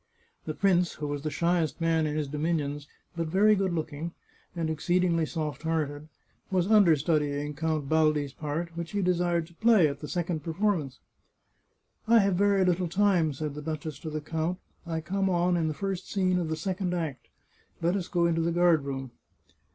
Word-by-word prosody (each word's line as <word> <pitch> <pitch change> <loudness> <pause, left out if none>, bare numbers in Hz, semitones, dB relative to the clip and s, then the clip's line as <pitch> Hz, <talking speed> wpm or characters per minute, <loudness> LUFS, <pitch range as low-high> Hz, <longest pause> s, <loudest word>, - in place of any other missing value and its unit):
The 155 - -4
prince, 180 -3 +2
who 150 - -6
was 145 -1 -3
the 155 - -2
shyest 170 0 0
man 165 -1 +2
in 150 - -2
his 150 -2 -1
dominions, 145 -1 -2 0.3
but 165 -1 -2
very 205 +6 +4
good 195 -2 +1
looking, 160 0 -4 0.4
and 165 -2 -1
exceedingly 165 +1 +1
soft 150 -5 -4
hearted, 155 -2 -2 0.4
was 185 -2 +1
under 200 -7 +6
studying 150 -1 0
Count 155 -1 -2
Baldi's 155 -2 +2
part, 160 +3 -4
which 170 +3 -5
he 200 -1 0
desired 175 -2 +1
to 170 - -19
play 220 -3 +4
at 140 -1 -4
the 150 - -7
second 175 0 -2
performance. 165 -6 -1 0.6
" - - -44
I 230 +1 +6
have 200 -3 +4
very 200 +1 +3
little 180 0 +1
time," 185 -4 +3
said 150 +1 -4
the 150 - -7
duchess 155 -2 -5
to 160 - -6
the 155 0 -4
count. 160 +3 -2 0.2
" - - -38
I 165 -1 -2
come 195 +4 -1
on 175 0 +2
in 165 -2 +1
the 155 - -2
first 195 0 -4
scene 185 -2 +1
of 170 -3 -2
the 160 - -1
second 180 +1 -2
act. 150 -8 -4 0.5
Let 170 +3 +1
us 185 -3 -2
go 175 -3 +1
into 165 -1 +1
the 170 +1 +1
guard 170 -4 +3
room." 135 -2 -5
165 Hz, 195 wpm, -28 LUFS, 150-180 Hz, 0.6 s, under